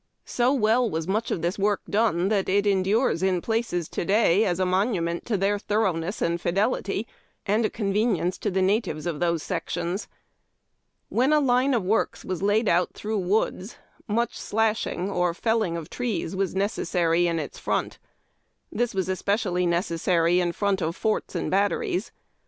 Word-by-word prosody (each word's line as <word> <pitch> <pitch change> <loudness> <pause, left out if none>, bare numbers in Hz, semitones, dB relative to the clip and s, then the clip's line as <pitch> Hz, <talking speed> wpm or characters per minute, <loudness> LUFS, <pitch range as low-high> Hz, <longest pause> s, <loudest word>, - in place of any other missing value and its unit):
So 245 +1 +1
well 240 -2 +2
was 160 -2 -3
much 215 +4 -1
of 165 - -2
this 175 +3 -1
work 205 0 +1
done 200 -5 +1
tliat 200 -3 +1
it 200 +2 +2
endures 200 +1 +2
in 190 -1 +2
places 220 -5 -1
to - - -3
day 200 0 +3
as 180 -2 0
a 185 - +2
monument 180 -3 0
to 220 -4 +1
their 200 +2 +1
thoroughness 195 -4 -1
and 170 0 0
iidelit}^ 200 +2 0 0.4
and 215 +3 +2
a - - +1
convenience 200 -4 0
to - - -1
the 190 -1 +1
natives 190 -6 0
of 165 -4 -3
those 170 -2 0
sections. 175 +1 -3 1.0
When 255 +5 +2
a 305 - +5
line 260 -1 +2
of 225 - 0
works 210 +5 0
was 185 -1 -3
laid 205 +3 +2
out 175 0 +2
through 215 0 -2
woods, 195 +2 -1 0.3
much 235 +2 -1
slashhu/^ 215 -4 -1
or 180 -1 +1
felling 220 -5 0
of 160 -2 -6
trees, 230 -7 -3
was 190 -1 -1
necessar}' 175 -4 +1
in 170 -1 0
its 150 -3 -5
front. - - -2 0.7
This 240 -2 -1
was 190 -1 0
especially 185 -1 0
necessary 170 0 +1
in 175 -1 +1
front 200 +1 0
of 165 +1 -1
forts 215 +1 -1
and - - -2
batteries. 200 0 0
195 Hz, 170 wpm, -25 LUFS, 175-220 Hz, 1.0 s, a